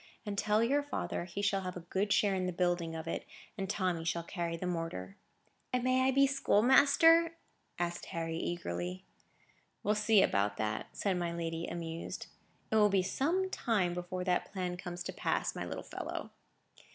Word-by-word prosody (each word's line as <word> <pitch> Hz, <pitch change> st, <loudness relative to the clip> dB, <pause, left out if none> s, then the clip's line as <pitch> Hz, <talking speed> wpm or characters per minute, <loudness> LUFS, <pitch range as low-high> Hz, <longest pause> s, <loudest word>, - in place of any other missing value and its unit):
And 205 Hz, -1 st, -3 dB
tell 210 Hz, +2 st, +2 dB
your 280 Hz, +5 st, +3 dB
father 285 Hz, -10 st, -3 dB
he 185 Hz, +3 st, -5 dB
shall 195 Hz, -1 st, +2 dB
have 180 Hz, -1 st, -5 dB
a -, -, -6 dB
good 190 Hz, +4 st, -1 dB
share 200 Hz, -1 st, +4 dB
in 185 Hz, -1 st, 0 dB
the -, -, -1 dB
building 175 Hz, -2 st, 0 dB
of 160 Hz, -, -6 dB
it, -, -, -2 dB, 0.3 s
and 195 Hz, -3 st, -4 dB
Tommy 185 Hz, -5 st, 0 dB
shall 170 Hz, +1 st, -1 dB
carry 170 Hz, -1 st, -3 dB
the 180 Hz, -, -4 dB
mortar." 165 Hz, -, -3 dB, 0.6 s
"And 250 Hz, -, +1 dB
I -, -, -7 dB
may 255 Hz, +1 st, +3 dB
be 275 Hz, +1 st, +5 dB
schoolmaster?" 285 Hz, +6 st, +5 dB, 0.4 s
asked 175 Hz, 0 st, -2 dB
Harry, 165 Hz, -1 st, -3 dB
eagerly. 90 Hz, -, -3 dB, 0.8 s
"We'll 210 Hz, -, +3 dB
see 210 Hz, -1 st, +5 dB
about 100 Hz, 0 st, +1 dB
that," 110 Hz, 0 st, -2 dB
said 195 Hz, -3 st, +1 dB
my 170 Hz, -1 st, -1 dB
lady, 165 Hz, 0 st, -3 dB
amused. 165 Hz, -1 st, -5 dB, 0.5 s
"It 220 Hz, -, +4 dB
will 210 Hz, -1 st, +6 dB
be 195 Hz, -2 st, +3 dB
some 335 Hz, -, +1 dB
time 195 Hz, -7 st, +1 dB
before 180 Hz, +1 st, -4 dB
that 180 Hz, -1 st, 0 dB
plan 180 Hz, -2 st, -2 dB
comes 175 Hz, -1 st, -6 dB
to -, -, -5 dB
pass, -, -, 0 dB
my -, -, -3 dB
little -, -, -5 dB
fellow." -, -, -6 dB
180 Hz, 180 wpm, -33 LUFS, 170-210 Hz, 0.8 s, will